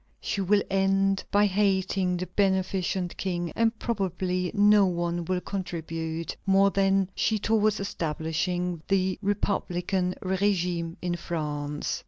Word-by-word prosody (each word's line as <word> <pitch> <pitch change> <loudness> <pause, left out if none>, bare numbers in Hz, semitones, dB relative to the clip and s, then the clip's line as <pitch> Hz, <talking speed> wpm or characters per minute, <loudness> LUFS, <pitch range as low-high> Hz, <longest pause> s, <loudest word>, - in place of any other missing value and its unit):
She 200 - -2
will 200 +2 +3
end 195 0 +2
by 205 +1 +4
hating 190 -2 +1
the 180 - -3
beneficent 190 -2 0
King, 175 -3 -2
and 230 0 +1
probably 185 -5 -1
no 205 -1 +6
one 175 -1 -2
will 180 +1 -1
contribute 165 -4 -4
more 195 +1 +5
than 195 -1 +2
she 220 - +1
towards 215 0 +2
establishing 175 -1 -2
the 190 -1 +1
republican 185 -2 -1
régime 180 -3 0
in 175 -1 -1
France. 150 -3 -3
185 Hz, 120 wpm, -27 LUFS, 175-195 Hz, -, no